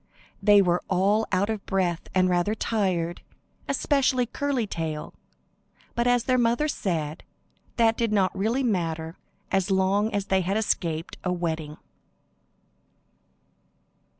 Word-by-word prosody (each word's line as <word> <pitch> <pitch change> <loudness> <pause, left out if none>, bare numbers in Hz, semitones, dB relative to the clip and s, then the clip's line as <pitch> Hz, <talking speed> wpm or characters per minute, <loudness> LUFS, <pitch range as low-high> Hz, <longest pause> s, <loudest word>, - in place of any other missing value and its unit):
They 205 0 +6
were 175 -1 +1
all 200 +4 +2
out 200 +3 +1
of 215 -3 -4
breath 180 -3 -1
and 185 0 +4
rather 180 +4 +1
tired, 185 -7 -1 0.5
especially 270 -2 +2
Curly 265 0 -1
Tail, 160 -5 -4 0.8
but 235 +1 0
as 245 -1 +3
their 255 -1 +2
mother 240 +5 +2
said, 165 - -2 0.6
that 225 -1 +3
did 230 -2 0
not 195 -3 +2
really 225 +7 0
matter 165 -7 -1 0.4
as 195 0 +1
long 195 +3 +2
as 200 -1 -1
they 190 -1 +2
had 190 +3 -1
escaped 170 -6 -1
a 180 - 0
wetting. 160 -4 -3
195 Hz, 125 wpm, -26 LUFS, 175-225 Hz, 0.8 s, They